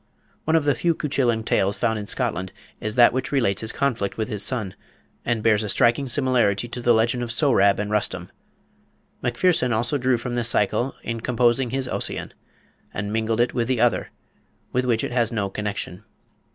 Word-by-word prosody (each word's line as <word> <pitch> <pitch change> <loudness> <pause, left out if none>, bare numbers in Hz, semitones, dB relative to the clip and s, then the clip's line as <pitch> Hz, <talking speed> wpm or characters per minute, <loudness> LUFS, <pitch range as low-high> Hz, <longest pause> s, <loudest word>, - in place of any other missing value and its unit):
One 160 - +2
of 160 -3 +2
the 145 - +4
few 170 +2 0
Cuchullin 125 -7 0
tales 100 -2 +1
found 115 -2 0
in 105 - -7
Scotland 95 -8 -2 0.3
is 110 0 -3
that 120 -1 +6
which 130 +1 -2
relates 115 -9 +1
his 110 0 -2
conflict 120 -8 -1
with 110 -1 -2
his 105 -2 -2
son, 105 -3 -1 0.5
and 115 -2 -1
bears 110 -2 +3
a 105 - -4
striking 125 +4 +2
similarity 120 -5 +1
to 120 - -6
the 120 - +3
legend 120 +2 +2
of 120 -1 -3
Sohrab 115 -7 +3
and 105 0 -3
Rustum. 95 -4 -1 0.9
Macpherson 125 +1 +1
also 120 +5 +1
drew 130 -1 +2
from 120 +1 -5
this 120 -1 +1
Cycle 120 +5 +1
in 115 0 -3
composing 120 +1 +2
his 130 +1 -1
Ossian, - - -3 0.6
and 100 +1 -4
mingled 110 0 0
it 120 - +1
with 120 -2 -1
the 130 -2 0
other, 120 -1 +2 0.6
with 125 0 +1
which 115 -3 +1
it - - -3
has 120 -2 +1
no 100 -4 -2
connection. 105 -2 -5
120 Hz, 190 wpm, -23 LUFS, 105-125 Hz, 0.9 s, that